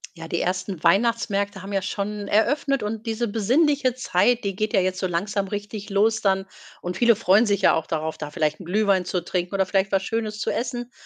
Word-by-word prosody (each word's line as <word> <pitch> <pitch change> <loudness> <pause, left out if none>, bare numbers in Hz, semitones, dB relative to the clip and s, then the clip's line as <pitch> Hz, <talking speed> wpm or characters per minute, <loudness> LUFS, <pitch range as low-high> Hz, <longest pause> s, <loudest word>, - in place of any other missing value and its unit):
Ja, 165 -1 -8
die 170 +1 -2
ersten 185 -1 -2
Weihnachtsmärkte 200 0 +1
haben 195 +1 -7
ja 195 - +1
schon 205 +2 -4
eröffnet 275 +5 +1
und 215 +1 -4
diese 225 +1 -1
besinnliche 255 +6 +2
Zeit, 245 -1 +1
die 200 -2 -2
geht 215 +3 -2
ja 200 - +5
jetzt 185 0 -1
so 185 - 0
langsam 195 +3 -2
richtig 205 +1 -6
los 215 +2 +2
dann 190 -1 +1 0.4
und 180 0 -4
viele 235 0 +5
freuen 210 +1 +4
sich 200 -2 +1
ja - - +5
auch 160 -1 0
darauf, 160 0 -3
da 150 -1 -6
vielleicht 155 0 -1
'n 185 - -10
Glühwein 195 0 +2
zu 180 0 -2
trinken 180 +1 -3
oder 190 -1 +2
vielleicht 195 +1 0
was 195 -1 +1
Schönes 215 -1 -3
zu - - -1
essen. 245 0 -3
200 Hz, 215 wpm, -24 LUFS, 185-225 Hz, 0.4 s, ja